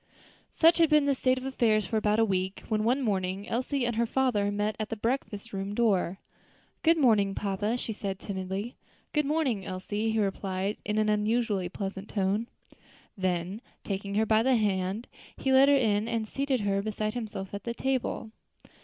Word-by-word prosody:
_ - - -41 0.5
Such 335 +1 +5
had 330 -2 +5
been 300 -2 +5
the 280 - +3
state 255 0 +1
of 255 - -5
affairs 225 -6 +2
for 220 - -3
about 210 0 +2
a 225 - +4
week, 190 -1 -2
when 215 -1 +1
one 255 +5 +2
morning 195 -2 -1
Elsie 255 +2 -1
and 235 -2 -1
her 235 0 +2
father 230 -6 +1
met 205 +1 -1
at 215 - -3
the 225 - -2
breakfast 225 -2 -3
room 195 +1 -3
door. 195 -6 +2 0.6
"Good 330 0 +4
morning, 210 -8 +3
papa," 205 +3 -1
she 225 - -4
said 200 -3 -4
timidly. 195 +4 -4 0.4
"Good 300 -2 +1
morning, 280 -10 0
Elsie," 205 +4 -3
he 220 - -1
replied 195 0 -1
in 210 0 -2
an 215 0 +2
unusually 210 -3 +1
pleasant 195 +1 -5
tone. 205 +3 0 0.7
Then, 185 +1 -2 0.2
taking 200 0 -3
her 220 +1 +3
by 220 0 +4
the 260 +2 +3
hand, 200 0 0 0.3
he 265 - +1
led 270 +1 +7
her 285 - +6
in 215 -4 +1
and 230 -2 -1
seated 275 0 -1
her 200 -1 +1
beside 215 0 -2
himself 210 -5 -5
at 200 -1 -5
the 235 0 -4
table. 255 -4 -2
215 Hz, 190 wpm, -28 LUFS, 200-240 Hz, 0.7 s, led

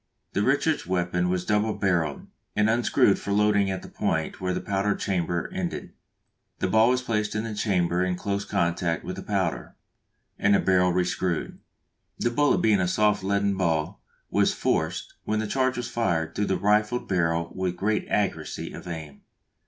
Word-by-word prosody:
The - - +1
Richards 140 - +1
weapon 90 -1 0
was 90 0 -1
double 105 +1 +1
barrelled, 85 -7 0 0.3
and 105 +1 +3
unscrewed 115 -3 +3
for 100 - -4
loading 105 -1 +3
at 95 -1 -3
the - - -9
point - - -2
where 90 0 0
the - - -1
powder 100 +1 0
chamber 85 -3 -1
ended; 185 -2 -4 0.6
the - - 0
ball 110 +5 +4
was 125 0 +1
placed 105 -4 -1
in 110 - -1
this 105 -2 -3
chamber 90 -3 +1
in 90 -1 0
close 100 +2 -2
contact 85 -1 0
with - - -5
the - - -6
powder, - - -2 0.6
and 100 0 +4
the - - +4
barrel 90 -1 +3
rescrewed. 90 -1 -1 0.6
The 120 - 0
bullet 145 +4 +2
being 105 -3 +4
a 90 - +1
soft 105 +1 +2
leaden 100 0 +1
ball, 80 -5 -1 0.3
was - - +2
forced, - - -1
when 110 - 0
the 110 - -1
charge 130 +3 0
was 120 - -3
fired, 85 -9 -1
through 105 - 0
the 95 - +1
rifled 105 +5 +1
barrel 85 -2 0
with 90 -1 -2
great 105 +3 0
accuracy 105 -2 -2
of - - -9
aim. 80 -4 -7
100 Hz, 175 wpm, -26 LUFS, 90-105 Hz, 0.6 s, ball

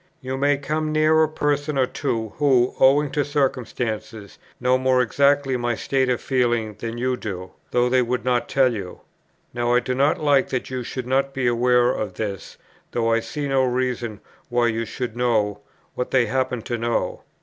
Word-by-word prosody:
You 130 -1 -4
may 140 +1 +2
come 155 +2 -2
near 155 +1 +4
a 155 - +3
person 145 -1 -1
or 130 - +4
two 115 -4 -3
who, 130 -4 +3
owing 140 +2 +4
to 145 - +1
circumstances, 115 -7 -3 0.2
know 125 +1 +2
more 130 0 +2
exactly 140 +2 +2
my 120 -1 -1
state 130 +2 0
of 125 - +1
feeling 120 -5 0
than 115 0 -5
you 125 +1 0
do, 95 -6 -6 0.2
though 125 0 +2
they 130 +1 +3
would 125 0 -2
not 125 -1 +1
tell 130 -3 +3
you. 95 -5 -7 0.5
Now 120 0 +1
I - - +5
do 125 +1 -3
not 140 +3 +2
like 145 -3 +3
that 130 0 -3
you 130 -1 -3
should 125 +1 -5
not 135 +2 0
be 135 -2 -1
aware 120 +1 +3
of 105 -7 -4
this, 100 -2 -5 0.4
though 115 -1 +1
I 115 - +3
see 140 +6 -4
no 135 -1 +2
reason 125 -3 -2 0.3
why 120 -1 +2
you 115 +1 -2
should 120 -1 -5
know 110 -4 +1 0.3
what 125 - -3
they 130 -2 +3
happen 125 0 -1
to 120 -1 -3
know. 115 0 -1
125 Hz, 190 wpm, -23 LUFS, 120-135 Hz, 0.5 s, I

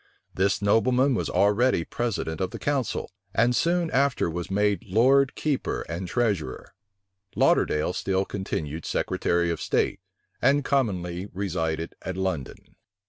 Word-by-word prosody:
This 100 +1 +1
nobleman 125 +6 +3
was - - -1
already 105 -2 +2
president 95 -9 -3
of 95 - 0
the - - -7
council; 140 -10 -2 0.2
and 120 +2 +3
soon 170 +2 +1
after 135 -9 +1
was 90 +2 -4
made 105 +1 +1
lord 130 +7 +4
keeper 150 -4 -1
and 85 +3 -5
treasurer. 90 - -2 0.6
Lauderdale 75 +4 +2
still 95 +1 0
continued 80 -6 -4
secretary 85 0 0
of 85 - -4
state, - - 0 0.4
and 140 0 +3
commonly 95 -9 -1
resided 85 -4 -2
at 95 0 -5
London. 95 -8 -4
100 Hz, 130 wpm, -26 LUFS, 85-125 Hz, 0.6 s, lord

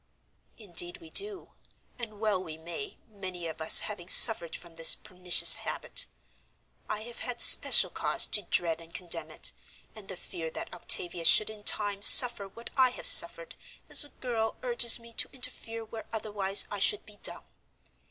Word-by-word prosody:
"Indeed 175 -5 -6
we 160 -1 -17
do, 405 -2 -5 0.5
and 215 -3 -11
well 210 -4 -3
we 160 -3 -12
may, 175 - -11
many 185 -5 -10
of 160 0 -11
us 160 - +6
having 190 -4 -9
suffered 180 -8 +2
from 170 -1 -14
this 165 0 +7
pernicious 180 -1 +2
habit. - - -3 0.8
I 215 - -6
have 235 +1 -14
had 245 -1 -9
special - - +6
cause - - -3
to 210 - -1
dread 170 -3 -4
and 165 0 -17
condemn 165 -3 -3
it, 110 - -6 0.4
and 215 -3 -14
the 190 - -9
fear 165 -2 -10
that - - -11
Octavia 175 -1 -3
should 215 +5 +2
in 215 -1 -11
time 205 -2 +1
suffer 235 -2 +6
what 230 +4 -14
I 260 -1 +1
have 250 - -12
suffered - - +3 0.4
as - - +4
a 290 - -4
girl 235 -4 -7
urges 240 -2 +4
me 230 0 -15
to - - -4
interfere 230 -3 -4
where 220 0 -13
otherwise 205 -3 -3
I 205 - -7
should 205 +1 -1
be 210 -1 -16
dumb. - - -7
205 Hz, 170 wpm, -26 LUFS, 175-230 Hz, 0.8 s, this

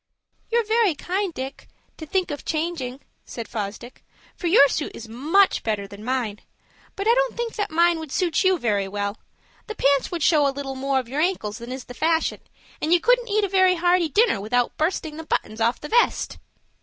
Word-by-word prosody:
"You're 465 0 +2
very 440 -5 +2
kind, 375 +5 -2
Dick, 265 -2 -7 0.3
to 315 - -8
think 370 0 0
of 290 - -5
changing," 305 -5 -3 0.2
said 230 -2 -7
Fosdick, 215 +3 -6 0.3
"for 355 - -3
your 330 -5 +7
suit 295 +2 -3
is 230 - -9
much 310 - +2
better 210 -3 -2
than 200 +1 -11
mine; 235 -4 -2 0.6
but 395 +2 -3
I 460 - +6
don't - - 0
think 470 -1 -3
that 415 - -2
mine 335 +1 +3
would 315 -3 -8
suit 360 +1 +1
you 375 -1 +4
very 205 - 0
well. 200 +1 -3 0.5
The 435 - -6
pants 280 -5 +2
would 340 -3 -3
show 300 -4 +4
a - - +2
little 275 0 -5
more 270 +1 -1
of 255 -2 -2
your 275 +5 -2
ankles 280 - -1
than 235 +2 -8
is 260 0 -5
the 245 - -10
fashion, 325 +5 0 0.4
and 315 - -1
you 350 - +6
couldn't - - +2
eat 420 +1 +2
a - - +2
very 375 -1 +4
hearty 350 -1 +2
dinner 410 - +3
without 240 +4 0
bursting 315 -1 -2
the 320 - -6
buttons 220 -7 -2
off 235 +2 +2
the 300 - -8
vest." 475 0 +1
310 Hz, 205 wpm, -23 LUFS, 245-370 Hz, 0.6 s, your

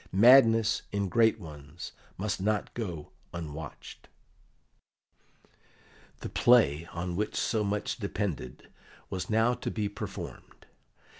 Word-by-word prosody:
"Madness 115 +1 +6
in 100 -1 -1
great 110 +3 +3
ones 75 -2 -9 0.3
must 100 0 -2
not 105 +1 0
go 90 -10 -5 0.2
unwatched." 80 -2 -8 2.1
The - - -5
play 85 - +4
on 90 +1 -4
which 105 +3 -2
so 110 -2 0
much 100 0 -2
depended 95 - -4 0.4
was 95 -1 -4
now 110 +2 +3
to - - -4
be 105 -2 -2
performed. 100 - -8
100 Hz, 105 wpm, -29 LUFS, 85-110 Hz, 2.1 s, Madness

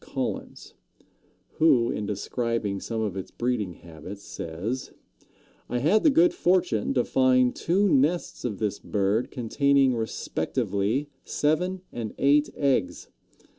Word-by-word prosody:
Collins, - - -5 0.9
who, 125 -7 +4
in 105 - -3
describing 105 0 -2
some 115 +2 -3
of 105 -4 -2
its 95 - -5
breeding 120 -7 -2
habits, 85 +4 -11
says: 95 +11 -5 0.8
"I 125 - -1
had 165 - +3
the - - +5
good 175 - +4
fortune 155 - +1
to 125 - +3
find 130 -1 +3
two 195 +4 +2
nests 160 +2 +1
of 110 -5 -3
this 105 -1 -2
bird 105 +3 0
containing 135 +2 +2
respectively 110 - -2
seven 180 +5 0
and 115 -3 -5
eight 145 +2 +3
eggs. 140 -2 0
125 Hz, 125 wpm, -26 LUFS, 105-145 Hz, 0.9 s, the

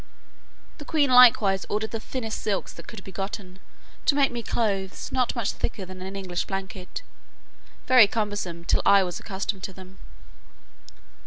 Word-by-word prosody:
The - - -7
queen 295 -3 +1
likewise 225 -6 +6
ordered 215 +1 -2
the 225 - -3
thinnest 225 -1 -5
silks 200 -3 -2
that - - -12
could 215 -4 -9
be 195 - -10
gotten, 190 0 -6 0.5
to 280 - +5
make 280 -2 +3
me 240 -1 -4
clothes, 200 -5 -2
not 255 -2 +1
much 235 -4 0
thicker 215 -5 -4
than 185 0 -10
an 190 +1 -6
English 185 -3 -3
blanket, 190 -1 -6 0.8
very 250 -5 +7
cumbersome 205 -6 -3
till - - +2
I 200 -1 +6
was 180 -1 -4
accustomed 195 -1 -4
to 190 - -5
them. 185 0 -13
200 Hz, 160 wpm, -25 LUFS, 190-230 Hz, 0.8 s, very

